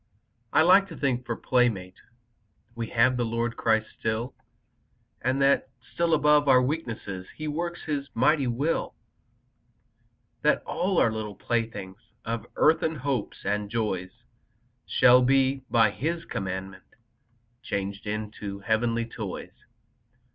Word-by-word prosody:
I 155 - +5
like 195 +3 +6
to 165 - -10
think, 125 -3 -1
for 115 - -1
playmate 110 -9 0 0.7
We 115 -1 -4
have 125 +3 +3
the 120 - +1
Lord 115 0 -1
Christ 110 -1 +2
still, 115 +3 -2 0.9
And 130 +2 0
that 140 0 +3 0.2
still 170 -1 +2
above 150 -1 +4
our 130 -2 +7
weakness 115 - -3
He 155 - -4
works 170 +3 -3
His 145 -2 -3
mighty 135 +3 +3
will, 140 +7 -1 1.5
That - - +2
all 185 +1 -1
our 115 - +4
little 110 -2 -5
playthings 105 -3 -3 0.3
Of 115 0 -3
earthen 160 +1 +3
hopes 135 -5 -3
and 105 0 -1
joys 105 -5 -2 0.8
Shall 125 0 +6
be, 135 +1 +3
by 110 -3 +4
His 165 +8 -3
commandment, 95 0 -6 0.7
Changed 100 -3 -4
into 105 -1 -5
heavenly 115 +2 0
toys. 110 -4 -7
120 Hz, 125 wpm, -27 LUFS, 105-140 Hz, 1.5 s, our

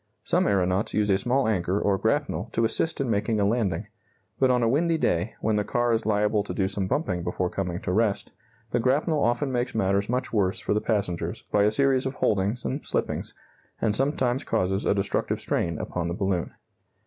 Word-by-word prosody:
Some - - +2
aeronauts 95 0 +1
use 105 -1 +2
a 95 - +3
small 125 +4 +1
anchor 95 -2 0
or 100 -2 +1
grapnel 95 +6 0
to 115 - +2
assist 160 +8 0
in 135 -4 0
making 105 +1 0
a 100 - +3
landing, 100 -6 0 0.5
but 130 - +4
on 125 -1 +3
a - - +3
windy 165 +7 +2
day, 105 - 0
when 110 -1 +1
the 105 - +1
car 120 +2 +1
is 110 -1 -1
liable 105 0 +2
to - - -5
do 95 -2 +1
some 95 -1 -2
bumping 95 - -1
before 90 +1 -2
coming 90 -3 -3
to 100 - -2
rest, 105 +1 0 0.4
the - - +1
grapnel 145 +5 +1
often 120 +4 +1
makes 120 -1 -1
matters 100 -1 +1
much 125 0 -2
worse 95 -3 +1
for - - -1
the 105 - +1
passengers 95 -3 -2
by 100 0 +4
a 105 - +3
series 135 +2 +2
of 130 - -5
holdings 105 +4 0
and 140 +3 -2
slippings, - - -3 0.4
and 105 -2 +1
sometimes 135 -1 0
causes 95 -2 0
a - - +3
destructive 100 - -1
strain 85 -2 -1
upon 85 +2 -3
the 85 - -2
balloon. 95 -3 -1
105 Hz, 205 wpm, -26 LUFS, 95-125 Hz, 0.5 s, but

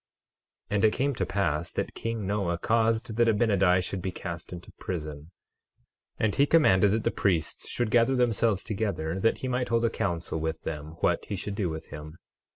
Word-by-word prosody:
12:17 - - +1
And 105 - +3
it 110 - +4
came 140 +2 0
to - - -1
pass 85 -4 -1
that - - -3
king 115 -3 -3
Noah 95 -3 0
caused 115 +3 +1
that 120 -1 +4
Abinadi 100 -5 +3
should 95 0 -3
be 95 - -2
cast 85 -2 -7
into 90 -1 -9
prison; 75 -3 -5 0.9
and 110 -2 +1
he 140 - +3
commanded 105 - +5
that 110 +2 0
the - - +1
priests 90 -6 0
should 120 -3 -1
gather 120 +2 +4
themselves 115 -4 +2
together 95 -6 -2
that 115 +4 +2
he 130 - -4
might 125 0 -1
hold 115 0 +2
a 115 - +1
council 85 -3 -2
with 80 0 -3
them 75 0 -5
what - - +1
he 100 - -4
should 100 +2 -4
do 100 -3 -1
with 80 0 -6
him. 75 +2 -9
100 Hz, 195 wpm, -28 LUFS, 85-115 Hz, 0.9 s, commanded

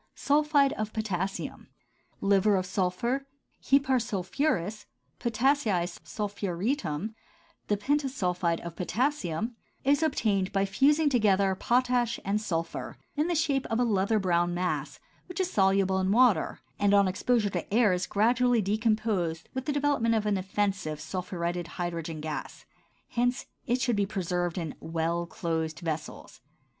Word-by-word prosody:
SULPHIDE 290 -1 +3
OF 215 0 -3
POTASSIUM, 195 -3 -3 0.5
liver 200 +1 +4
of 185 -1 0
sulphur, 200 +9 -1 0.3
hepar 270 -2 +3
sulphuris, 215 - -1 0.3
potassii 235 -6 +2 0.2
sulphuretum, 205 - -2 0.5
the 205 - +1
pentasulphide 200 - 0
of 170 -1 -7
potassium, 225 - -1 0.3
is 285 +3 +3
obtained 210 -11 +1
by 195 0 +1
fusing 290 +10 +3
together 200 -7 +3
potash 245 +3 +1
and 205 +2 0
sulphur, 165 -6 -3 0.2
in 300 +2 +1
the 350 - 0
shape 290 -4 +1
of 225 0 -1
a - - +4
leather 215 -1 +2
brown 175 -3 +1
mass 180 +1 -2 0.3
which 360 -1 -6
is 370 -1 0
soluble 195 -1 +3
in 190 0 +1
water 225 -7 +3 0.2
and 205 0 +4
on 200 -1 +5
exposure 210 +3 +1
to 180 - -1
the - - -11
air 215 -3 +4
is 180 0 -1
gradually 240 +3 +3
decomposed 210 -5 0
with 260 0 -4
the 300 - 0
development 285 -6 +2
of 220 - +1
the 205 -2 +1
offensive 190 -5 -1
sulphuretted 175 -1 -3
hydrogen 170 -2 -3
gas; 155 -1 -6 0.4
hence 245 +1 0 0.2
it 245 +2 +1
should 245 -2 +1
be 200 -1 +1
preserved 180 -4 -2
in 165 -4 -3
well 165 +1 -2
closed 160 -2 -3
vessels. 160 -2 -5
205 Hz, 140 wpm, -28 LUFS, 180-245 Hz, 0.5 s, on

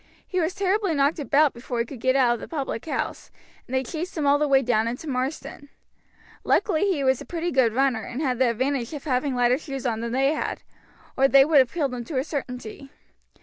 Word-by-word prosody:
He 370 - -1
was 335 +3 -1
terribly 390 -2 0
knocked 285 +3 +2
about 290 0 +3
before 240 +1 -6
he 235 - 0
could 250 +1 -10
get 260 +3 +1
out 250 -3 +4
of 240 - -4
the - - -8
public 275 -7 -4
house, - - -3 0.4
and 260 - -4
they 260 - +1
chased 335 +7 -6
him 300 - -1
all 285 +1 +4
the 300 - +1
way 270 -1 +4
down 230 -2 +1
into 245 +7 -5
Marsden. 275 +1 -4 0.7
Luckily 395 +1 +2
he 295 -6 -1
was 260 -1 +2
a - - -6
pretty 345 0 -3
good 255 -4 +3
runner, 265 -4 +2
and 240 +4 -6
had 255 -5 -1
the 260 -2 +4
advantage 255 +2 -1
of 285 - -7
having 260 -1 0
lighter 245 +1 +2
shoes 275 -4 -6
on 225 -3 -1
than 235 0 -4
they 270 +4 +2
had, 310 - -4 0.5
or 270 - +4
they 270 0 +6
would 305 -1 +5
have 260 -2 +3
killed 285 -7 -1
him 245 -1 -4
to 285 - -4
a 260 - +1
certainty. 270 -2 -6
270 Hz, 230 wpm, -24 LUFS, 250-300 Hz, 0.7 s, they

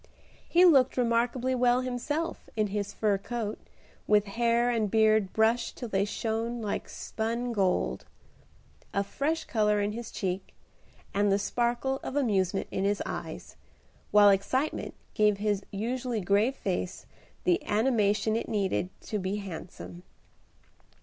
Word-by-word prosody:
He 355 +2 +6
looked 270 -8 +5
remarkably 245 +1 +1
well 250 0 +3
himself 290 +6 -3
in 215 -1 +2
his 205 -1 -2
fur 205 -3 +1
coat, 220 0 -4 0.5
with 210 -1 +4
hair 235 +3 +1
and 220 -3 0
beard 215 -2 +3
brushed 225 +2 +1
till 240 - -5
they 195 -1 +1
shone 225 +3 -2
like 210 -3 -3
spun 235 +2 -3
gold, 180 - 0 0.9
a 200 - +2
fresh 305 +10 -1
color 210 -2 +2
in 205 0 0
his 230 +1 -6
cheek, 190 -1 -4 0.6
and 205 0 +2
the 195 - +4
sparkle 240 +5 0
of 265 - -5
amusement 195 -9 +1
in 190 - -1
his 205 +1 +1
eyes, - - -6 0.5
while 205 -1 +7
excitement 255 +10 -1 0.2
gave 210 -1 +3
his 205 -1 0
usually 240 +3 -2
grave 205 +7 +2
face 185 0 -3 0.4
the 360 -1 +2
animation 215 -1 +2
it 230 - -2
needed 195 -3 0
to 210 - -3
be 190 +1 -2
handsome. 180 -2 -8
220 Hz, 135 wpm, -29 LUFS, 200-240 Hz, 0.9 s, while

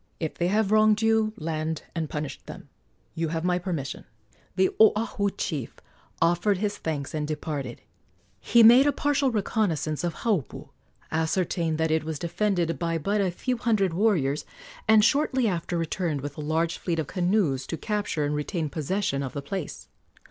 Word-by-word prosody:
If 160 -2 -2
they 175 - -1
have 210 +1 +1
wronged 215 0 +4
you, 220 -1 +3
land 155 0 -3
and 160 -3 -3
punish 150 -2 -5
them. - - -10 0.4
You 165 0 -1
have 160 +1 -3
my 180 0 +1
permission." 165 -7 -4 0.5
The 190 0 +3
Oahu 215 -1 +3
chief 145 -9 -3 0.4
offered 175 +4 +2
his 205 +1 -2
thanks 145 -4 -3
and 150 -1 -2
departed. 150 -5 -4 0.6
He 235 - +5
made 245 +5 +8
a - - +4
partial 285 -1 +1
reconnoissance 195 - -1
of 170 -3 -2
Haupu, 205 - -1 0.4
ascertained 160 0 0
that 160 0 0
it 160 0 +1
was 155 -1 -4
defended 175 0 -1
by 165 -1 0
but 200 +6 0
a 190 - +1
few 250 +8 -2
hundred 215 -7 +1
warriors, 165 -8 +1 0.4
and 215 -1 +6
shortly 265 -2 +2
after 175 -2 -2
returned 165 -2 -2
with 145 0 -6
a - - -6
large 160 +2 -1
fleet 170 -2 -2
of 160 - -1
canoes 175 -7 0
to 165 - -4
capture 205 -8 -1
and 145 - -1
retain 155 +2 -2
possession 155 -1 -1
of 135 -2 -4
the 140 - -4
place. 175 +2 -5
170 Hz, 170 wpm, -26 LUFS, 155-210 Hz, 0.6 s, made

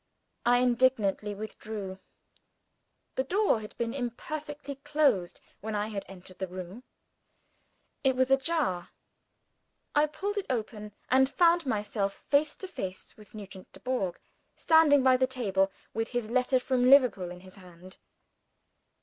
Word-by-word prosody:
I 245 0 +6
indignantly 240 -5 +2
withdrew. 210 -2 -7 1.1
The 260 - 0
door 385 - +2
had 210 - -11
been 230 0 -2
imperfectly 285 +3 -5
closed 280 - +1 0.2
when 215 +1 -4
I 210 +1 -1
had 200 -2 -5
entered 185 -1 -12
the 190 - -2
room: 185 +4 -8 1.2
it 265 -2 +3
was 260 +1 +1
ajar. 270 - +1 1.0
I 295 0 +4
pulled 400 +7 -3
it 395 - -6
open 215 -4 -4 0.2
and 265 +1 +5
found 340 0 +3
myself 205 -3 -1
face 290 +1 +1
to 380 - -7
face 190 - -7
with 210 0 -16
Nugent 195 -3 -10
Dubourg, 250 -8 -3 0.4
standing 310 -4 +5
by 260 -1 +5
the 260 0 +2
table, 195 -7 0 0.2
with 225 0 -1
his 245 -3 -3
letter 255 +1 +2
from 250 -1 +2
Liverpool 250 -10 +5
in 180 0 -10
his 185 +1 -15
hand! 180 0 -14
240 Hz, 135 wpm, -29 LUFS, 195-275 Hz, 1.2 s, I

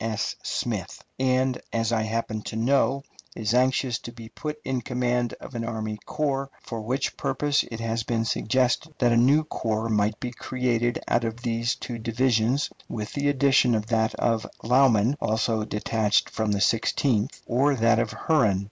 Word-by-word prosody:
S. 110 -2 -2
Smith - - -3 0.2
and, 130 0 +1
as 115 0 0
I 110 - +2
happen 110 0 -2
to - - -5
know, 135 +3 +2 0.3
is 110 0 -1
anxious 125 -1 +2
to 120 - -8
be 115 -2 -11
put 150 +6 -5
in 130 -2 -1
command 125 -1 -1
of - - -10
an 115 -1 -3
army 110 -2 -4
corps, 140 -2 -1
for 115 -2 -6
which 130 +5 -2
purpose 145 -1 +1
it 115 - -6
has 115 0 -1
been 115 0 -1
suggested 130 +7 0
that 120 -2 +3
a - - +4
new 135 +6 +5
corps 110 -6 -2
might 105 0 +1
be 125 - -4
created 120 -1 -1
out 120 - +2
of 115 +1 -4
these 115 0 0
two 120 -2 -6
divisions, 120 +3 +1 0.2
with 105 -1 -5
the 145 0 +1
addition 135 -3 +4
of 105 -1 -1
that 110 -1 +1
of 115 -2 0 0.2
Lauman, 125 -1 +4
also 110 0 +1
detached 105 0 +1
from 110 -1 -1
the 100 -1 0
Sixteenth, 115 +3 +1
or 140 +4 +2
that 115 -1 +3
of 115 -2 0
Herron. 110 - +2
115 Hz, 175 wpm, -25 LUFS, 110-130 Hz, 0.3 s, new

